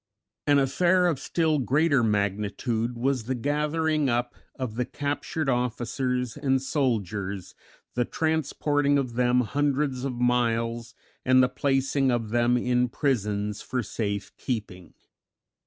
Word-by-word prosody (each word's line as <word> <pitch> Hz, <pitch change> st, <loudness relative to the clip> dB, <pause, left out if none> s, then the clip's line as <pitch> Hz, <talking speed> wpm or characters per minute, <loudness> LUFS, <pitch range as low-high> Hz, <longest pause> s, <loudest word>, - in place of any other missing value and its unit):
An 145 Hz, -1 st, +5 dB
affair 175 Hz, +7 st, +3 dB
of 165 Hz, -6 st, +1 dB
still 160 Hz, -3 st, +1 dB
greater 140 Hz, +3 st, +3 dB
magnitude 105 Hz, +3 st, -1 dB
was 130 Hz, -1 st, 0 dB
the 130 Hz, +2 st, -1 dB
gathering 150 Hz, +2 st, 0 dB
up 120 Hz, 0 st, 0 dB, 0.2 s
of 130 Hz, -4 st, -4 dB
the 125 Hz, +3 st, -1 dB
captured 145 Hz, +3 st, -3 dB
officers 125 Hz, 0 st, -1 dB
and 135 Hz, -2 st, +1 dB
soldiers, 105 Hz, -, -2 dB, 0.4 s
the 120 Hz, -, +1 dB
transporting 145 Hz, -1 st, +1 dB
of 130 Hz, -4 st, -1 dB
them 125 Hz, +1 st, +3 dB
hundreds 140 Hz, +1 st, 0 dB
of 135 Hz, -2 st, -2 dB
miles, 120 Hz, -1 st, 0 dB, 0.3 s
and 130 Hz, 0 st, +5 dB
the 125 Hz, -, +3 dB
placing 135 Hz, +1 st, +1 dB
of 120 Hz, -3 st, 0 dB
them 120 Hz, +1 st, +3 dB
in 125 Hz, 0 st, +1 dB
prisons 105 Hz, -6 st, -1 dB
for 125 Hz, -1 st, -2 dB
safe 100 Hz, -1 st, -4 dB
keeping. 100 Hz, -8 st, -5 dB
125 Hz, 125 wpm, -26 LUFS, 115-140 Hz, 0.4 s, An